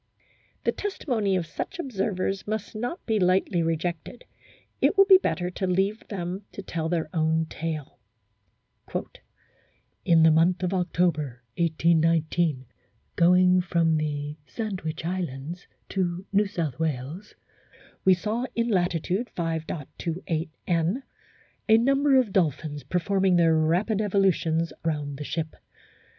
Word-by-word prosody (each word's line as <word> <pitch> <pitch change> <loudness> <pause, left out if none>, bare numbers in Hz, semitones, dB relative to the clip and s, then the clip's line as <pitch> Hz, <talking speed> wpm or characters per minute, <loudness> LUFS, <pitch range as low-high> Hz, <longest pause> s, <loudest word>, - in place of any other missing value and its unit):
The - - +2
testimony 240 - -1
of 180 -2 0
such 270 - -5
observers 195 - -2
must 215 -1 -3
not 245 +11 -4
be 220 -2 +1
lightly 185 -1 +2
rejected; 165 +6 -3 0.6
it 420 - +3
will 395 - +8
be 380 -1 +8
better 180 - -1
to 190 +1 -2
leave 195 +4 0
them 185 -1 -4
to 200 - -7
tell 165 -3 -3
their 165 -2 0
own 160 -1 +1
tale: 155 -5 -5 2.0
"In 165 -1 +5
the 160 - +7
month 175 +4 +3
of 180 +1 0
October, 165 -8 0
1819, 165 -3 +2 0.5
going 180 +1 +5
from 170 -2 +2
the 150 -1 -3
Sandwich 185 -8 -4
Islands 170 -2 -4 0.2
to 180 -1 -2
New 205 +1 +3
South 165 -8 -3
Wales 155 +5 -3 0.7
we 190 -1 +6
saw 220 +7 -2
in 235 0 +1
latitude 180 +3 0
5.28 165 0 -3 0.2
N. 175 +9 0 0.7
a 220 - +8
number 275 +4 +3
of 250 -7 +3
dolphins 155 -4 0
performing 190 +2 +1
their 165 -2 +4
rapid 175 +7 +1
evolutions 185 -5 +1
round 150 -3 -2
the - - -3
ship. 155 +1 -4
175 Hz, 125 wpm, -26 LUFS, 160-195 Hz, 2.0 s, will